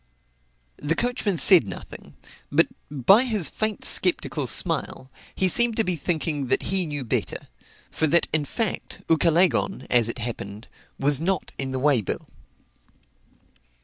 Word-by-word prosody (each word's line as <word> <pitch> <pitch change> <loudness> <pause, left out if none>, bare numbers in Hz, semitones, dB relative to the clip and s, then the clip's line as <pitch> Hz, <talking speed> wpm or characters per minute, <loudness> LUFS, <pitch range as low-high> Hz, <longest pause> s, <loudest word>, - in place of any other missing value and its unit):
The 150 +3 -2
coachman 235 -4 -1
said 170 - +6
nothing, 95 - -10 0.4
but, - - +4 0.2
by 150 - +4
his 215 - +2
faint 215 -2 -3
sceptical 160 -6 +2
smile, 150 -4 +1 0.2
he 190 - +1
seemed 235 +5 +3
to 225 - +2
be 180 -3 -1
thinking 155 -4 -3
that - - 0
he 190 -3 0
knew 145 -2 -5
better; 115 - -4 0.4
for 160 - 0
that 170 +3 +3
in 155 -2 +1
fact, 220 - -4
Ucalegon, 170 +4 +1
as 120 -2 +3
it - - -4
happened, 110 -2 -7 0.3
was 140 +1 +1
not 190 +3 -2
in 135 -1 -3
the 130 - -3
way 135 -3 +2
bill. 100 - -5
160 Hz, 145 wpm, -23 LUFS, 135-190 Hz, 0.4 s, said